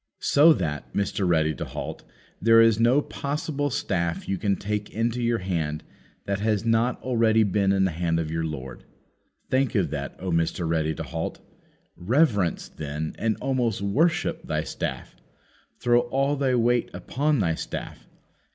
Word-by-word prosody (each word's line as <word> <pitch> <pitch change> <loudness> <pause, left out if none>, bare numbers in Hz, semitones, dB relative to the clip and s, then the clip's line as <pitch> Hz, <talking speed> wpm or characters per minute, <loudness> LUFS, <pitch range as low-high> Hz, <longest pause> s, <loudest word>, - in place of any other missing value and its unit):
So 150 +4 +5
that, 75 - -3
Mr. 100 -1 0
Ready 80 -2 +2
to - - -5
halt, - - -6 0.4
there 115 0 +6
is 115 -1 +5
no 125 +5 +4
possible 145 0 -3
staff 85 -9 -2
you 95 -1 -1
can 100 -2 +1
take 105 +1 -3
into 115 +2 -1
your 120 0 +1
hand 80 -6 -2 0.4
that 100 0 -1
has 105 0 0
not 115 +2 +2
already 115 -3 +3
been 100 -1 +2
in 95 -1 +2
the 95 - 0
hand 85 0 0
of 80 -1 -3
your 80 0 -1
Lord. 65 -5 -6 0.7
Think 130 -1 +1
of 90 -8 +1
that, 70 -2 -4
O 95 -1 -4
Mr. 85 +1 0
Ready 80 -1 0
to - - -5
halt! - - -4 0.6
Reverence, 105 - +1
then, 75 +1 -5
and 110 -1 0
almost 120 -7 0
worship 160 +13 +1
thy - - -2
staff! - - -5 0.6
Throw 120 0 +4
all 135 +4 0
thy 135 -2 +1
weight 120 0 +2
upon 140 +11 0
thy 90 -7 +1
staff. - - -6
105 Hz, 160 wpm, -25 LUFS, 85-120 Hz, 0.7 s, there